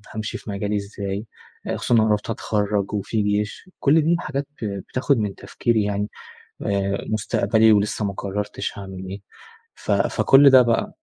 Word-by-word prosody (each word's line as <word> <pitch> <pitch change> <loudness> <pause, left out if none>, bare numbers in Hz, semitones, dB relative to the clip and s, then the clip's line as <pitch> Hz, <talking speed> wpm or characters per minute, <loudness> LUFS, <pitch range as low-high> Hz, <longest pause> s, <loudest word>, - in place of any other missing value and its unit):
هامشي 110 0 -3
في - - -11
مجالي 105 +1 -2
إزاي، 100 +1 -4 0.5
خصوصًا - - -1
إن - - +6
أنا 110 0 +3
قربت 105 +1 0
أتخرج 105 -2 -1
وفي 105 +1 -1
جيش، 105 - -2
كل 155 +3 +4
دي 165 +3 +2
الحاجات 145 -4 -2 0.2
ب - - 0 0.2
بتاخد 130 +1 +1
من 105 -3 -2
تفكيري 115 -3 0
يعني، 105 0 -2 0.5
آآ 100 0 -1
مستقبلي 110 +1 +3
ولسّه 105 +1 +1
ما 100 - -1
قررتش 100 +1 -4
هاعمل 95 -1 -7
إيه، 100 +1 -6 0.5
ف - - -7
فكلّ 140 +1 +5
ده 130 -1 +8
بقى. 115 -1 0
105 Hz, 160 wpm, -22 LUFS, 100-115 Hz, 0.5 s, ده